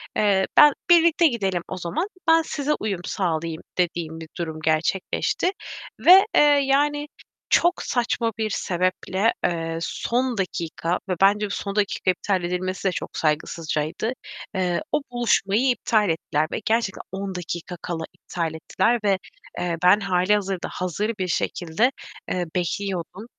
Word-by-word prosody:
eee, 200 -2 +3
ben, 295 -1 +9 0.2
birlikte 335 -1 +6
gidelim 195 - -1
o 185 - -5
zaman, 175 - -2 0.2
ben 325 0 +6
size 300 -1 -1
uyum 200 -5 -2
sağlayayım." 165 -3 -2 0.2
dediğim 165 -2 -1
bir 160 - -8
durum 160 -2 -4
gerçekleşti. 165 - 0 0.5
Ve, 380 +3 +9
eee, - - +7 0.2
yani 290 +2 +1 0.4
çok 350 +2 +3
saçma 235 -1 0
bir 220 -1 -1
sebeple, 185 +3 0
eee, 165 -1 -1
son 245 +5 -1
dakika 170 -2 -2
ve 185 - +1
bence 205 +2 +4
bu - - -6
son 200 0 -4
dakika 200 -2 +1
iptal 185 0 -1
edilmesi 185 +2 -2
de - - +2
çok - - -6
saygısızcaydı. 155 +5 -1 0.4
Eee, 180 -2 0
o 295 - +1
buluşmayı 240 0 +2
iptal 215 -5 +1
ettiler 155 -1 0
ve - - -2
gerçekten 225 -3 0
10 195 -1 -4
dakika 175 0 -5
kala 165 -2 -4
iptal 170 -2 -4
ettiler 230 +8 0
ve, 195 -2 +2 0.4
eee, 170 -1 -1
ben 190 +4 +6
hâlihazırda 195 0 0
hazır 185 +5 -2
bir 185 - -1
şekilde, 175 +8 0 0.4
eee, 180 -1 -1
bekliyordum. 185 +2 -3
190 Hz, 140 wpm, -23 LUFS, 170-225 Hz, 0.5 s, ben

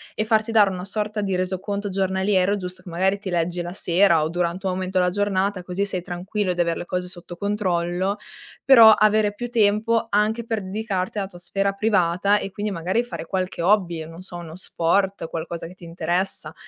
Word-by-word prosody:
e 215 - -1
farti 220 0 +1
dare 210 -3 +5
una 180 -1 -5
sorta 210 +1 -2
di 195 -2 -1
resoconto 195 +3 -2
giornaliero, 190 +1 +1
giusto 185 -1 -7
che - - -10
magari 190 +4 +1
ti 200 - -6
leggi 175 0 -1
la 175 +1 -5
sera 175 -3 +3
o 155 - -1
durante 175 +2 -2
un 185 - 0
momento 185 0 -3
della 180 0 +2
giornata. 200 -1 0
Così 185 +3 -2
sei 185 -2 -1
tranquillo 185 +2 -2
di 175 - -8
aver 170 -1 0
le - - -5
cose 180 0 -3
sotto 175 -1 -9
controllo, 190 -2 -1 0.5
però 230 -5 +9
avere 215 -1 +3
più 240 +3 -5
tempo 225 +1 +2
anche 215 +3 +1
per 225 -3 -2
dedicarti 205 -1 -2
alla 195 - -2
tua 180 -2 -13
sfera 195 +2 0
privata 200 -1 +2
e 195 - -5
quindi 205 +1 -3
magari 185 +6 0
fare 240 - -6
qualche 185 -1 -3
hobby, 175 -4 +2
non 165 +2 -11
so, 180 -2 -8
uno 165 -1 -9
sport, 185 +1 0
qualcosa 165 0 -5
che 175 - -12
ti 180 - -18
interessa. 175 +3 -2
190 Hz, 200 wpm, -23 LUFS, 175-205 Hz, 0.5 s, però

